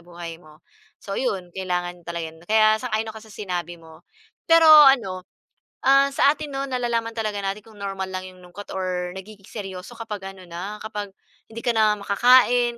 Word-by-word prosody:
buhay 170 -1 -9
mo. 155 0 -19 0.3
So 195 - -9
'yon, 190 -7 -2
kailangan 180 -1 -3
talaga 165 -2 -4
no'n, 165 +3 -19
kaya 215 0 +4
sang-ayon 220 -3 -2
ako 220 - -10
sa 215 -1 -15
sinabi 180 -4 -4
mo. 160 -1 -16 0.5
Pero 330 0 +6
ano, 270 -12 +6 0.5
ah, 275 +1 +4
sa 280 - +4
atin 295 -1 -2
no 270 - -2
nalalaman 235 -2 -1
talaga 210 -2 -2
natin 195 +1 -4
kung 220 - -16
normal 190 -1 -4
lang 185 - -3
yung 185 - -17
lungkot 195 +3 -11
or 180 -1 -3
nagiging 195 0 -12
seryoso 195 +2 -8
kapag 210 -4 -6
ano 190 -1 -13
na, 180 +5 -6
kapag 210 -2 -6 0.4
hindi 225 +1 -8
ka 235 - +3
na 215 -1 +3
makakain, 240 +3 +4
205 Hz, 180 wpm, -23 LUFS, 180-230 Hz, 0.5 s, Pero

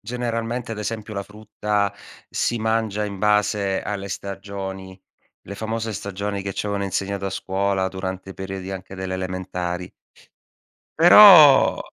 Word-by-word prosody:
generalmente, 120 +1 -4
ad 110 - -7
esempio, 110 0 -5
la 100 -1 -3
frutta 105 -1 -3 0.4
si 120 - -1
mangia 110 -2 -1
in 100 -2 -6
base 105 -1 +1
alle 100 -1 -5
stagioni. 95 -1 -7 0.4
Le 100 - -9
famose 110 +1 -4
stagioni 100 0 -4
che 95 0 -5
ci - - -3
avevano 100 -1 -2
insegnato 100 +1 -3
a 95 - -3
scuola 95 0 -1
durante 95 0 -6
i - - -10
periodi 95 0 -6
anche 95 0 -8
delle 95 0 -5
elementari. 90 -1 -4 1.1
Però 170 -3 +8
100 Hz, 135 wpm, -22 LUFS, 95-110 Hz, 1.1 s, Però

